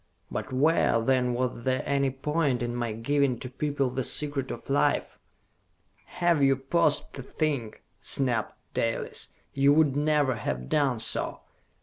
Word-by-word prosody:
"But -, -, -4 dB
where, 135 Hz, -2 st, +3 dB
then, 125 Hz, +1 st, +1 dB
was 125 Hz, -1 st, -2 dB
there 130 Hz, +1 st, 0 dB
any 140 Hz, -1 st, +1 dB
point 135 Hz, -2 st, -1 dB
in 120 Hz, 0 st, -3 dB
my 120 Hz, -2 st, -2 dB
giving 130 Hz, +3 st, 0 dB
to 125 Hz, -, -6 dB
people 140 Hz, -1 st, -1 dB
the 130 Hz, +1 st, -2 dB
Secret 145 Hz, 0 st, 0 dB
of -, -, -7 dB
Life?" 140 Hz, +1 st, +1 dB, 0.9 s
"Had 170 Hz, -4 st, +1 dB
you 135 Hz, -1 st, +5 dB
paused 145 Hz, +3 st, +1 dB
to 135 Hz, -, -6 dB
think," 135 Hz, -5 st, -3 dB, 0.2 s
snapped 120 Hz, -5 st, -1 dB, 0.2 s
Dalis, 115 Hz, 0 st, -2 dB, 0.2 s
"you 140 Hz, +1 st, +4 dB
would 150 Hz, -3 st, +3 dB
never 145 Hz, -4 st, +2 dB
have 65 Hz, -, -4 dB
done 140 Hz, -5 st, +2 dB
so! 110 Hz, 0 st, 0 dB
135 Hz, 145 wpm, -27 LUFS, 120-145 Hz, 0.9 s, you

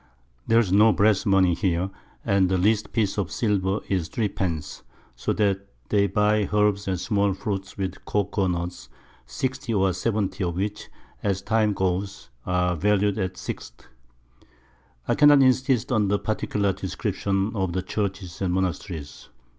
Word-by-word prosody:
There's 115 Hz, -4 st, +3 dB
no 105 Hz, +3 st, +6 dB
Brass 105 Hz, -1 st, +2 dB
Money 95 Hz, -3 st, +4 dB
here, 90 Hz, +1 st, 0 dB, 0.3 s
and 100 Hz, -4 st, +3 dB
the 95 Hz, -, +2 dB
least 105 Hz, +3 st, +1 dB
Piece 105 Hz, -3 st, 0 dB
of 95 Hz, -3 st, -2 dB
Silver 100 Hz, -2 st, 0 dB
is 90 Hz, -4 st, -1 dB
Three 105 Hz, +3 st, -1 dB
pence; 80 Hz, -6 st, -4 dB, 0.3 s
so -, -, -2 dB
that 100 Hz, -2 st, 0 dB, 0.2 s
they 100 Hz, -1 st, +3 dB
buy 105 Hz, +1 st, +2 dB
Herbs 105 Hz, -1 st, +2 dB
and 95 Hz, -2 st, -1 dB
small 100 Hz, -1 st, +1 dB
Fruit 95 Hz, -1 st, -4 dB
with 95 Hz, -2 st, -4 dB
Cocoa 100 Hz, -1 st, 0 dB
Nuts, 85 Hz, -7 st, -4 dB, 0.4 s
60 130 Hz, -, -3 dB
or 95 Hz, -2 st, +2 dB
70 100 Hz, -1 st, -1 dB
of 85 Hz, -2 st, -2 dB
which, 100 Hz, +3 st, -3 dB, 0.3 s
as 95 Hz, -1 st, -1 dB
the -, -, -18 dB
Time 110 Hz, -1 st, +3 dB
goes, 95 Hz, -7 st, -2 dB, 0.2 s
are 90 Hz, -1 st, +1 dB
valu'd 105 Hz, +3 st, +1 dB
at 95 Hz, -2 st, -2 dB
6_d._ -, -, -8 dB, 1.2 s
I -, -, +2 dB
cannot 145 Hz, -2 st, +6 dB
insist 130 Hz, -1 st, +2 dB
on 110 Hz, -4 st, +2 dB
the 100 Hz, +1 st, +2 dB
particular 100 Hz, -2 st, -1 dB
Description 100 Hz, +3 st, -2 dB
of 95 Hz, -4 st, -1 dB
the 95 Hz, 0 st, -1 dB
Churches 95 Hz, -4 st, -4 dB
and 95 Hz, -2 st, 0 dB
Monasteries. 85 Hz, -5 st, -4 dB
100 Hz, 155 wpm, -25 LUFS, 95-105 Hz, 1.2 s, no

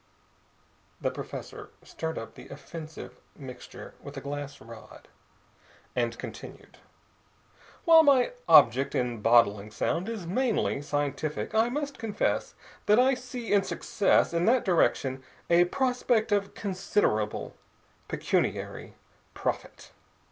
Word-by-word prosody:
The -, -, -1 dB
professor -, -, -8 dB
stirred 160 Hz, 0 st, -5 dB
up 115 Hz, -, -7 dB
the -, -, -12 dB
offensive 155 Hz, +2 st, -9 dB, 0.2 s
mixture 130 Hz, -4 st, -10 dB
with -, -, -10 dB
a -, -, -2 dB
glass 140 Hz, 0 st, -6 dB
rod, 115 Hz, 0 st, -13 dB, 0.9 s
and 120 Hz, -1 st, -1 dB
continued: -, -, -10 dB, 1.1 s
"While 330 Hz, -2 st, +8 dB
my 280 Hz, -, +4 dB, 0.2 s
object 130 Hz, +4 st, +6 dB
in 120 Hz, -3 st, -1 dB
bottling 110 Hz, -3 st, +4 dB
sound 170 Hz, -, -2 dB
is 220 Hz, -6 st, -5 dB
mainly 220 Hz, -, 0 dB
scientific, 145 Hz, +4 st, -2 dB
I 220 Hz, +2 st, +3 dB
must 285 Hz, +1 st, -4 dB
confess 225 Hz, -3 st, -1 dB, 0.3 s
that 210 Hz, -, +5 dB
I 260 Hz, +2 st, +5 dB
see 245 Hz, -3 st, -4 dB
in 200 Hz, -, +5 dB
success 195 Hz, -2 st, +1 dB
in 170 Hz, +1 st, +1 dB
that 245 Hz, +2 st, +3 dB
direction 135 Hz, -7 st, +1 dB, 0.3 s
a 175 Hz, +1 st, +6 dB
prospect 245 Hz, 0 st, 0 dB
of 200 Hz, -1 st, 0 dB
considerable 185 Hz, -, -1 dB, 0.5 s
pecuniary -, -, -2 dB, 0.4 s
profit. -, -, -4 dB
170 Hz, 115 wpm, -28 LUFS, -, 1.1 s, While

